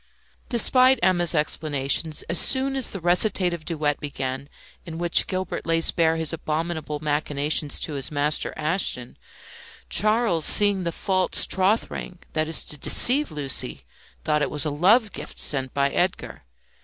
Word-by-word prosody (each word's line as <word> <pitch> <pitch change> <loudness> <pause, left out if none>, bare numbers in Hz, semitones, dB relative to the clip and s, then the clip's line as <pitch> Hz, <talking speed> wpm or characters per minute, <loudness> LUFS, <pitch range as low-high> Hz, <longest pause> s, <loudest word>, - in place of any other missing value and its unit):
Despite 255 +2 +4
Emma's 175 -2 +2
explanations, 150 0 -1
as 170 - 0
soon 270 +1 +1
as 265 - -1
the 195 - -5
recitative 175 -1 +1
duet 150 -3 -2
began 135 -1 -5 0.3
in 165 -1 -9
which 170 0 +1
Gilbert 185 -1 -4
lays 165 0 +1
bare 165 -2 +1
his 160 0 -1
abominable 160 -1 -4
machinations 150 0 -1
to 155 - -3
his 135 -3 -3
master 150 +1 -1
Ashton, 155 -6 -2 0.8
Charles, 215 -6 +1
seeing 200 -3 +5
the 170 - -2
false 185 +2 0
troth 190 +4 0
ring 180 - -8 0.2
that 155 0 -1
is 160 - +2
to 150 - -7
deceive 285 - +5
Lucie, 140 - -2 0.4
thought 150 -1 0
it 140 - -1
was 150 +1 -1
a 150 - -2
love 205 - +3
gift - - -10
sent 135 -3 0
by 140 0 0
Edgar. 180 - -3
160 Hz, 150 wpm, -23 LUFS, 150-185 Hz, 0.8 s, seeing